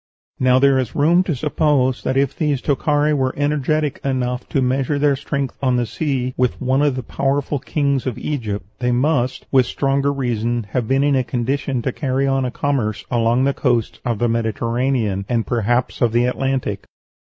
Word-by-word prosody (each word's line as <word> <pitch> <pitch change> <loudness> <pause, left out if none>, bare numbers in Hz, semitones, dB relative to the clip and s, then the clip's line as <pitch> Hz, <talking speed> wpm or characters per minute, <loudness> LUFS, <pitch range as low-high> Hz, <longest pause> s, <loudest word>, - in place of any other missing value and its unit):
Now 130 0 +4
there 135 0 +4
is 130 -4 -3
room 165 +5 +4
to 165 - -1
suppose 140 -2 +1
that 130 - -1
if 140 -1 +1
these 150 -4 0
Tokhari 145 +2 +1
were 130 -3 0
energetic 150 0 0
enough 125 -2 -2
to 140 - 0
measure 130 +2 0
their 145 -1 +3
strength 140 -1 -3
on 130 -2 +2
the 120 -1 +1
sea 130 -1 -2
with 125 -1 0
one 130 +1 +1
of 145 -3 +2
the 130 - -4
powerful 140 +2 -1
kings 140 -1 -1
of 125 - -3
Egypt, 110 -10 -3
they 125 0 0
must, 130 0 0
with 130 -2 +4
stronger 140 0 0
reason, 120 -3 -1
have 125 -3 -1
been 135 +2 +2
in 145 -1 +3
a 130 - +2
condition 130 +1 -2
to 130 - 0
carry 135 0 -1
on 135 -1 +1
a - - -1
commerce 120 -7 -1
along 120 +1 +2
the 140 +1 +2
coasts 120 -6 0
of 120 -3 -1
the 120 - +1
Mediterranean, 115 -1 0
and 115 -2 0
perhaps 120 +1 0
of 120 -2 +2
the 120 +1 +3
Atlantic. 125 -5 -2
130 Hz, 190 wpm, -20 LUFS, 120-140 Hz, -, Now